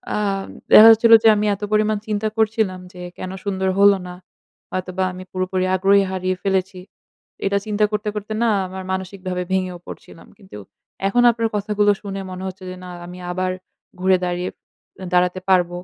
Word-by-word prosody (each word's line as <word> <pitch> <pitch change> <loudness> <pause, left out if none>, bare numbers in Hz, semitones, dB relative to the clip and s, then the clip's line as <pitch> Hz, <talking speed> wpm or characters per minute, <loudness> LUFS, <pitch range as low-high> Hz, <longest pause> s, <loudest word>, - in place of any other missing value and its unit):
আম 200 -2 -1 0.3
দেখা 220 +1 +10
যাচ্ছিল 225 +1 +5
যে - - +6
আমি 210 +1 0
এত 205 - -19
পরিমাণ 215 0 +2
চিন্তা 215 0 -1
করছিলাম 215 -4 0
যে 180 - -10 0.2
কেন 185 - -6
সুন্দর 190 -2 -1
হল 200 0 +7 0.2
না। 180 - -8 0.6
হয়তোবা 185 0 -3
আমি 185 +1 -9
পুরোপুরি 185 0 -1
আগ্রহই 195 +2 +4
হারিয়ে 185 0 -2
ফেলেছি। 190 -1 -1 0.7
এটা 200 0 +1
চিন্তা 210 0 +1
করতে 210 0 -2
করতে 210 +1 -5
না 230 - +3 0.2
আমার 190 0 -7
মানসিকভাবে 185 -1 -4
ভেঙেও 185 -1 -1
পড়ছিলাম। 165 - -12
কিন্তু 190 - -13 0.5
এখন 245 +5 +2
আপনার 230 -1 -2
কথাগুলো 205 0 +1
শুনে 195 -1 -5
মনে 185 +1 -7
হচ্ছে 185 0 -9
যে 185 - -7
না 180 - -9 0.2
আমি 180 +1 -10
আবার 185 +1 -1 0.5
ঘুরে 185 0 +3
দাঁড়িয়ে 180 +1 -2 0.6
দাঁড়াতে 180 +1 +2
পারব। 180 -2 +4
190 Hz, 165 wpm, -20 LUFS, 185-210 Hz, 0.7 s, দেখা